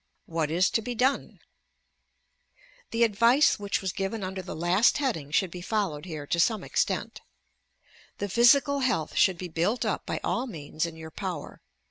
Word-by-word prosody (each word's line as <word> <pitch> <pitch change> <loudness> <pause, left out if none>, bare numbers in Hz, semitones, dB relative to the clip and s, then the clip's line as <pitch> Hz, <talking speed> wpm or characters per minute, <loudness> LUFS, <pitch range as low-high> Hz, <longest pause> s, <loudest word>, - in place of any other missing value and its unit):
What 165 -2 -2
is 175 +4 +2
to 225 - +1
be 245 +2 -5
done 260 +4 0
I - - -42 0.3
The 230 +1 +1
advice 235 +6 +4
which 205 -1 -1
was 190 -1 -2
given 195 +2 -3
under 190 0 -4
the 185 - -7
last 175 +7 +3
heading 235 - -2
should 175 +4 +1
be 180 - -7
followed 185 -6 -2
here 155 -5 -6
to 170 - -1
some 220 +5 +2
extent. - - -1 1.0
The 205 - -3
physical 245 +7 +4
health 230 - -1
should 190 -3 +4
be 180 - -5
built 175 +8 -1
up - - -2
by - - -2
all 250 +3 -1
means 155 - -4
in 165 - -9
your 160 0 -10
power. - - -6
190 Hz, 175 wpm, -27 LUFS, 165-230 Hz, 1.0 s, advice